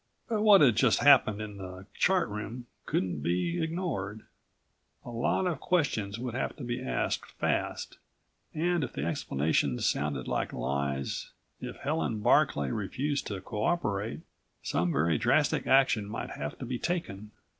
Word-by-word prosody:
But 220 -2 0
what 210 -3 +7
had 125 -7 +6
just - - +4
happened 125 -7 +6
in 105 -2 -8
the 95 0 -8
Chart 185 -6 +2
Room 110 +4 -6 0.2
couldn't 90 -6 -1
be 90 - 0
ignored. 160 - -3 0.8
A - - -7
lot 120 +10 0
of 175 -3 -1
questions 115 - 0
would 120 0 -4
have 130 - -2
to 145 - -8
be 120 0 -3
asked 60 -1 -2
fast, - - -2 0.5
and 170 +1 0
if - - -4
the 70 - -3
explanations 75 -5 0
sounded 70 -3 -1
like - - -1
lies, 70 +2 -2 0.3
if - - -6
Helen 140 -7 -1
Barclay 70 -9 +3
refused 140 +8 -2
to 100 -3 -4
cooperate, 105 - -1 0.4
some 85 0 0
very 80 +1 +2
drastic - - +2
action 130 -6 +4
might - - -5
have 75 0 -5
to - - -6
be 125 0 -3
taken. 110 - -3
110 Hz, 150 wpm, -29 LUFS, 90-145 Hz, 0.8 s, what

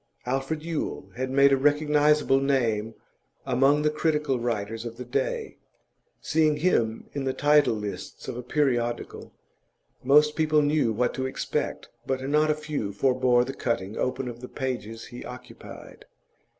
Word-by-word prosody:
Alfred 135 +5 -2
Yule 155 - -4
had 130 +2 -3
made 140 +1 +5
a - - +4
recognisable 150 0 +3
name 115 -6 0 0.5
among 135 +3 +3
the 150 - +2
critical 150 -4 0
writers 115 -1 -3
of 115 -1 -7
the 125 - -7
day; 455 - -2 0.6
seeing 155 -1 +2
him 120 -9 0
in 140 - -3
the 130 - -1
title 145 -4 +4
lists 105 -3 -7
of 130 - -4
a 125 - -5
periodical, 125 -3 -1 0.7
most 150 +3 +5
people 155 -1 +3
knew 145 -5 +2
what 120 +3 0
to 130 0 -2
expect, 130 - -3 0.2
but 130 -1 0
not 150 +2 +3
a 155 - +3
few 150 -9 -4
forbore 125 +2 +2
the 135 - -5
cutting 110 -6 -2
open 130 0 -2
of 120 -1 -7
the 125 - -8
pages 120 -4 -4
he 120 - -9
occupied. 125 - -11
135 Hz, 150 wpm, -26 LUFS, 120-150 Hz, 0.7 s, made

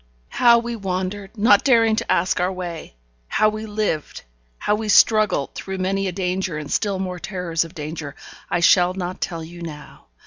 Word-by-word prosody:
How 235 -1 +5
we 235 0 -3
wandered 195 +1 -4
not 205 -1 +5
daring 230 -4 +4
to - - -1
ask 185 - +1
our 180 +1 +1
way 175 - -7 0.3
how 215 - +3
we 215 +1 -6
lived, 205 -8 -3 0.3
how 210 - 0
we 215 0 -2
struggled 215 -9 +4
through 190 0 -6
many 195 +1 -1
a - - -1
danger 180 -2 -2
and 150 -1 -7
still 200 -3 0
more 185 -1 -4
terrors 175 -3 -2
of 165 +2 -13
danger, 150 -2 -6 0.3
I 175 - 0
shall 180 +1 +4
not 185 -1 -5
tell 165 -2 -3
you 170 +2 -11
now. 150 -4 -10
185 Hz, 180 wpm, -22 LUFS, 170-210 Hz, 0.3 s, How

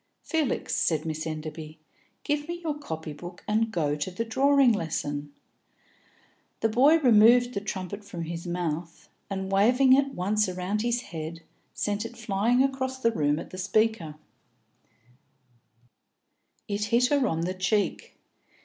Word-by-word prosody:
"Felix," 320 -4 -1
said 160 -1 +1
Miss 155 0 -3
Enderby, 155 0 -6 0.5
"give 295 0 -1
me 345 0 -4
your 315 -2 -1
copy 160 - -6
book 175 +4 -10
and 220 +1 +1
go 150 -7 0
to 150 +4 -3
the 185 +6 -4
drawing 275 +2 +4
lesson." 145 -5 -3 1.3
The 225 - +2
boy 270 +8 +5
removed 245 -2 +5
the 200 - -2
trumpet 200 0 -5
from 180 -4 -6
his 170 +1 -6
mouth, 170 -1 -4 0.2
and, 190 -1 -4
waving 250 +7 +5
it 275 +1 +4
once 205 +3 +1
round 185 +3 -2
his 240 +1 0
head, 165 -3 -7 0.3
sent 205 0 -1
it 230 +1 -8
flying 225 +3 +2
across 265 -1 -2
the 230 -3 +2
room 145 -7 +1
at - - -7
the 185 - -7
speaker; 200 -5 0 2.5
it 205 0 -1
hit 235 +3 +3
her 280 -3 +2
on 165 0 -1
the 180 +2 -1
cheek. 190 +2 -1
200 Hz, 145 wpm, -27 LUFS, 165-240 Hz, 2.5 s, boy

